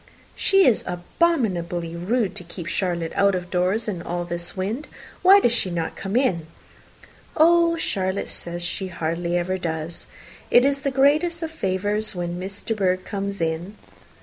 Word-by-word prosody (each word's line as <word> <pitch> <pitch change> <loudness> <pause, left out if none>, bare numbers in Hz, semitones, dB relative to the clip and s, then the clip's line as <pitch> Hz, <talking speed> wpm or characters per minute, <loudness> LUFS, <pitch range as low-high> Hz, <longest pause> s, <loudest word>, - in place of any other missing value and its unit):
"She 390 -1 +4
is 235 - +3
abominably 175 - 0
rude 200 +5 0
to - - -3
keep 175 0 -8
Charlotte 170 -2 -1
out 200 -1 +3
of 180 -1 -5
doors 185 +5 +1
in 185 -5 -3
all 175 0 -3
this 175 +1 -4
wind. 215 +10 -3 0.3
Why 390 +2 +8
does 240 - +3
she 230 -5 +1
not 170 -2 -3
come 195 +2 -4
in?" 185 - +1 0.9
"Oh, 335 +1 +5
Charlotte 190 - -1
says 175 0 -6
she 190 +2 -2
hardly 170 0 -2
ever 185 +2 -1
does. 160 -1 -5 0.4
It 245 - +6
is 280 0 +2
the 275 0 -1
greatest 305 +6 +2
of 320 - -3
favours 205 - -1
when 175 0 -3
Miss 195 +2 -5
De 225 - -1
Bourgh 185 -3 0
comes 200 -2 -4
in." 165 +5 -2
190 Hz, 165 wpm, -23 LUFS, 175-240 Hz, 0.9 s, Why